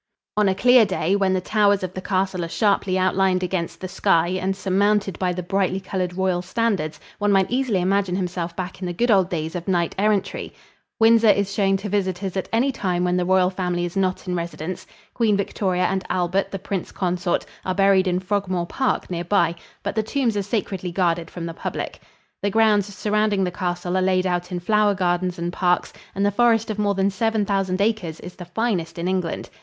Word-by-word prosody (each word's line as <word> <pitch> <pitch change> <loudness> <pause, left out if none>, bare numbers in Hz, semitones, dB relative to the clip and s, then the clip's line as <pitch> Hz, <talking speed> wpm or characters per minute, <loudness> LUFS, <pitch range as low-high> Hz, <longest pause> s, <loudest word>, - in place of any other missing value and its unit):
On 210 -2 +3
a 190 - +1
clear 245 +3 +6
day, 190 -2 0
when 195 -2 +2
the 185 - +1
towers 205 0 +2
of 185 -1 -4
the 185 - -5
castle 185 -1 -1
are - - -3
sharply 200 -1 +1
outlined 185 0 +2
against 180 -2 -3
the 185 - -5
sky 180 -3 +2
and 185 +1 -1
surmounted 195 0 +1
by 185 -1 +1
the 180 0 -4
brightly 190 +1 0
colored 185 -2 -3
royal 185 -2 +1
standards, 185 -5 -1 0.2
one 205 0 +2
might 195 +1 +3
easily 250 -6 +1
imagine 190 0 +1
himself 175 -2 -3
back 185 0 -5
in 180 - -2
the 175 - -3
good 240 0 +2
old 190 -3 +4
days 160 -3 -3
of 175 +1 -5
knight 175 -3 +1
errantry. 210 -1 0 0.5
Windsor 225 0 +6
is 200 -1 +2
shown 195 -1 +2
to 200 +2 -6
visitors 190 -1 -2
at 190 - -3
any 245 +5 +2
time 180 -7 -1
when 180 0 +1
the 180 -1 +1
royal 185 0 +3
family 180 -2 -1
is 175 - -6
not 185 -1 -1
in 180 - -1
residence. 170 0 -5 0.3
Queen 220 -4 +2
Victoria 185 -2 -1
and 190 0 0
Albert, 185 +2 0
the 195 - -4
Prince 195 -1 -4
Consort, 180 -1 -1 0.2
are 185 - -2
buried 195 -1 +4
in 180 0 +1
Frogmore 185 -2 -1
Park, 260 +8 -1
near 170 -1 -2
by, 175 -2 +2 0.3
but 200 - -2
the 220 - +1
tombs 235 0 -1
are 205 - +1
sacredly 190 -4 -3
guarded 170 -2 0
from 170 -2 -6
the 165 - -5
public. - - -5 0.4
The 200 - +1
grounds 210 -1 +3
surrounding 210 0 0
the 180 - -1
castle 175 -1 -3
are 185 - +2
laid 185 0 +2
out 180 -1 -1
in 175 -1 -3
flower 210 +2 +3
gardens 180 0 0
and 170 +1 -3
parks, 180 -1 +1 0.2
and 200 +1 +1
the 205 - +3
forest 225 0 +2
of 210 - -5
more 205 -1 +1
than 195 +1 +1
seven 220 +1 0
thousand 195 -2 0
acres 200 -7 -1
is 180 - -9
the 180 - -9
finest 180 -3 -2
in 170 +1 -2
England. 185 -3 -2
190 Hz, 210 wpm, -22 LUFS, 180-205 Hz, 0.5 s, clear